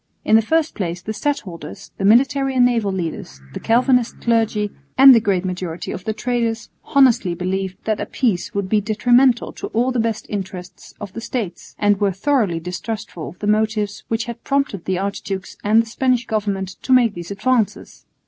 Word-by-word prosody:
In 220 - +4
the 225 - +6
first 320 +7 +1
place 175 -4 -3
the 190 +5 -6
stadholders, 200 - -5
the 195 - 0
military 270 +5 +3
and 250 -1 +5
naval 230 -5 +1
leaders, 165 - -5
the - - -5
Calvinist 245 +1 +2
clergy, 220 -3 +1 0.3
and 270 0 +10
the 235 - +6
great 195 -4 0
majority 180 -2 -4
of 185 - -7
the 220 - 0
traders 230 -1 -2
honestly 250 - +3
believed 185 +1 -3
that 215 -1 -1
a - - -3
peace 220 -9 -1
would 200 -1 -1
be 210 +2 +2
detrimental 240 +4 +3
to - - -6
all 245 +3 +2
the 250 - -1
best 225 -1 -1
interests 190 -3 -7
of 205 -3 -8
the 230 - -6
States, 225 -6 -5
and 205 -1 +2
were 200 -1 +3
thoroughly 200 -4 0
distrustful 180 0 -6
of 180 - -14
the 205 - -6
motives 210 -1 0
which 225 0 -1
had 235 0 -8
prompted 275 -10 -1
the 190 -1 -1
archdukes 195 0 -4
and 220 +2 +4
the - - -12
Spanish 250 +1 0
government 200 -4 -2
to - - -4
make 240 -4 +4
these 175 -2 -8
advances. 225 +2 -1
215 Hz, 185 wpm, -20 LUFS, 190-240 Hz, 0.3 s, and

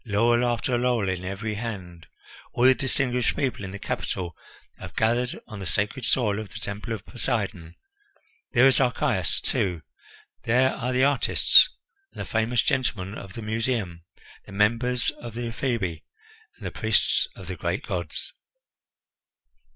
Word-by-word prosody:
Laurel 120 +2 +3
after 120 +1 0
laurel 120 -5 +1
in 90 -1 -2
every 100 +4 -3
hand! 95 -6 -6 0.5
All 120 - 0
the 130 +1 +8
distinguished 125 -1 0
people 130 -6 -1
in 95 - -4
the 100 - -6
capital 90 -3 -3 0.4
have - - -9
gathered 120 +2 +1
on 105 -3 -9
the 95 - -5
sacred 105 +8 0
soil 110 -4 +2
of 110 -2 -6
the 115 - -9
Temple 100 +3 -5
of 110 -2 -6
Poseidon. 100 -9 -3 0.8
There 125 - +6
is 135 -1 +5
Archias, 125 -2 +1
too; 90 -5 -1 0.6
there 125 +3 +3
are 125 +2 -2
the 130 +1 +2
artists 140 0 +6 0.4
and - - -12
the - - -3
famous 115 +2 +1
gentlemen 105 -6 0
of 95 -4 -9
the 115 - -7
Museum, 110 -6 -2 0.4
the - - -11
members 115 +5 +2
of 120 -2 -10
the 120 0 -3
Ephebi, 115 - -2 0.6
and - - -10
the - - -3
priests - - +2
of - - -10
the - - -5
great - - -2
gods." - - -3
115 Hz, 155 wpm, -26 LUFS, 100-125 Hz, 0.8 s, the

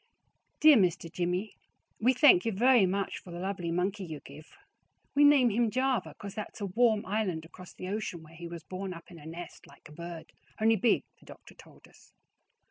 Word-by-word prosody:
Dear 305 -3 +8
Mr. 175 -4 +1
Jimie 180 +5 -2 0.5
We 250 +4 +4
thank 250 - +6
you 230 - 0
very 235 0 +4
much 195 +2 -2
for - - -15
the 170 - -7
lovly 185 -1 -3
monkey 190 +4 -1
you 160 -4 -7
give. 145 +3 -13 0.7
We 285 - +4
name 280 -5 +6
him 230 +2 +1
java 250 - -1
because 200 -1 -8
that's 215 +1 -7
a 205 - -3
warm 220 +2 +2
iland 190 -5 -2
across 180 +2 -13
the - - -8
ocian 195 -4 -4
where 160 +1 -16
he 170 +1 -8
was 170 -1 -8
born 185 +2 -6
up 170 +2 -13
in 170 - -11
a 150 - -12
nest 170 +2 -9
like - - -17
a - - -16
bird 170 0 -9 0.3
only 225 +1 +4
big 220 +3 +2 0.2
the - - -22
doctor - - -14
told - - -18
us. - - -22
190 Hz, 205 wpm, -30 LUFS, 170-220 Hz, 0.7 s, Dear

